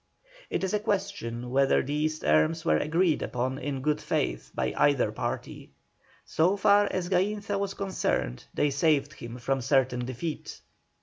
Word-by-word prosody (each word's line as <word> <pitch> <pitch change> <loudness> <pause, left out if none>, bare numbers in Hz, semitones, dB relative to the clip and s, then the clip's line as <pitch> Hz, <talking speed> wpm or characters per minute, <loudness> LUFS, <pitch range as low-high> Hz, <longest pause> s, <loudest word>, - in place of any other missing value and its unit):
It - - -2
is 190 - -1
a 210 - +2
question 190 - -3
whether 135 +1 +3
these 150 +3 -1
terms 80 - +2
were 75 -1 +3
agreed 165 +1 +1
upon 130 +2 -2
in 135 -1 -4
good 150 0 +1
faith - - -2
by - - -1
either 135 -7 +3
party. 110 - -5 0.5
So 180 +5 +2
far 205 +1 +5
as 180 -2 -2
Gainza 200 +2 0
was 200 -1 -2
concerned, 65 - -2
they 145 - +1
saved 145 0 +2
him 120 +1 -8
from 135 +2 -1
certain 130 -1 +2
defeat. 130 +6 -5
145 Hz, 150 wpm, -28 LUFS, 125-190 Hz, 0.5 s, far